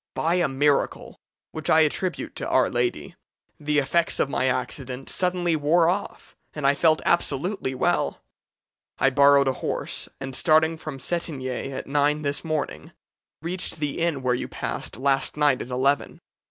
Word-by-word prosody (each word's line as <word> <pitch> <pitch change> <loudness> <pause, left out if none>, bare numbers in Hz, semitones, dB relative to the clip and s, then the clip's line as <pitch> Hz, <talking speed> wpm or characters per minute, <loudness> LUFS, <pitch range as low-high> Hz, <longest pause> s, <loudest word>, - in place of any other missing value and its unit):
By 165 +2 +1
a 175 -2 +2
miracle, 140 +1 0 0.3
which 155 - -4
I 160 - +6
attribute 170 +4 -1
to - - -4
Our 130 - +3
Lady, 120 -11 -2 0.4
the 150 0 0
effects 165 +4 +1
of 140 - +1
my 130 - +1
accident 130 +1 -3
suddenly 180 -2 +1
wore 160 +3 +3
off, 200 +3 -4 0.2
and 150 -2 -4
I 140 - +5
felt 155 +2 +2
absolutely 150 -2 0
well. - - 0 0.8
I 135 - +3
borrowed 140 0 +5
a 130 - +2
horse, - - -3
and, 135 -1 -5
starting 160 +1 +3
from 150 -3 -7
Cetinge 160 -2 -2 0.3
at 135 - -5
nine 145 +1 +1
this 140 0 -2
morning, 155 -3 -4 0.5
reached 180 +2 -1
the 150 0 -2
inn 165 -5 -1
where 125 -1 +2
you 125 - -3
passed - - -5
last 135 +2 +1
night 145 -4 +3
at - - -6
eleven. 130 0 0
145 Hz, 160 wpm, -24 LUFS, 135-165 Hz, 0.8 s, I